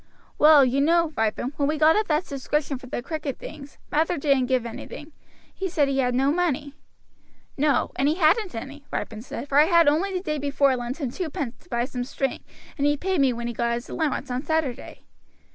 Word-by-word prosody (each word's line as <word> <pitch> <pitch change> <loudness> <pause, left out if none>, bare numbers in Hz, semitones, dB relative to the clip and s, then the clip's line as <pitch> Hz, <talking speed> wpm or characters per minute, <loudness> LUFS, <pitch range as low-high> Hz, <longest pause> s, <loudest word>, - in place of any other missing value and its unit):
"Well, 300 -2 +7
you 260 +2 +1
know, 335 +1 +3
Ripon, 225 +4 -1
when 280 - +1
we 305 +1 0
got 310 +1 +5
up 430 0 +1
that 310 +2 +1
subscription 280 0 -2
for 255 - -12
the 240 - -4
cricket 300 -3 -4
things, 285 -2 -10
Mather 320 +3 +1
didn't 275 -3 +2
give 255 -2 +1
anything. 290 +6 -8 0.4
He 385 - -3
said 300 -5 +2
he 275 0 0
had 250 -2 +1
no 270 +2 +3
money." 300 -4 -1 0.8
"No; 290 -2 +1
and 275 - +2
he 310 - +1
hadn't 365 - +2
any," 275 +5 -7
Ripon 220 -1 -4
said, 245 +2 -7
"for 280 +1 +3
I 300 - +7
had 335 -1 +4
only 325 +7 +2
the 365 -1 -2
day 305 -5 -2
before 280 -1 +2
lent 245 +4 -5
him 270 -6 -2
twopence 285 -7 -5
to - - -24
buy 240 0 0
some 250 -2 -4
string, 270 +1 -3 0.4
and 285 - +2
he 290 0 +2
paid 370 -1 0
me 270 -2 +4
when 235 0 -5
he 240 - -3
got 235 +1 0
his 240 - -7
allowance 300 -5 -2
on 250 +1 -1
Saturday." 315 -5 -3
285 Hz, 215 wpm, -24 LUFS, 255-315 Hz, 0.8 s, Well